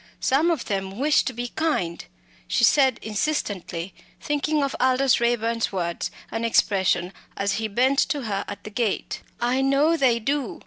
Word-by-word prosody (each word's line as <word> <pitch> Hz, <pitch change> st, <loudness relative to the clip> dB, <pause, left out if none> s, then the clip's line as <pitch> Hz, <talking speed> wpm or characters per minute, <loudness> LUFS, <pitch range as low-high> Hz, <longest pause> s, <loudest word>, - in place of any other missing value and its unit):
Some 290 Hz, +6 st, +2 dB
of 325 Hz, -8 st, -1 dB
them 195 Hz, -1 st, -3 dB
wish 295 Hz, +4 st, +3 dB
to -, -, -1 dB
be 245 Hz, 0 st, -5 dB
kind" 230 Hz, -, -1 dB, 0.4 s
she -, -, +3 dB, 0.2 s
added 260 Hz, -4 st, +3 dB
insistently, 200 Hz, -, -3 dB, 0.3 s
thinking 295 Hz, 0 st, 0 dB
of 275 Hz, -, -2 dB
Aldous 260 Hz, 0 st, +3 dB
Raeburn's 230 Hz, -1 st, 0 dB
words 170 Hz, -3 st, -2 dB, 0.2 s
and 225 Hz, -, -3 dB
expression 190 Hz, -5 st, +2 dB, 0.2 s
as 200 Hz, +1 st, 0 dB
he 220 Hz, -, -1 dB
bent 255 Hz, +6 st, +2 dB
to 290 Hz, -5 st, -2 dB
her 200 Hz, -3 st, -2 dB
at 200 Hz, 0 st, -8 dB
the 215 Hz, -, -8 dB
gate 225 Hz, -2 st, -2 dB, 0.2 s
"I 245 Hz, +2 st, +1 dB
know 275 Hz, +4 st, +3 dB
they 260 Hz, -7 st, +3 dB
do. 270 Hz, +2 st, -2 dB
235 Hz, 165 wpm, -24 LUFS, 200-275 Hz, 0.4 s, wish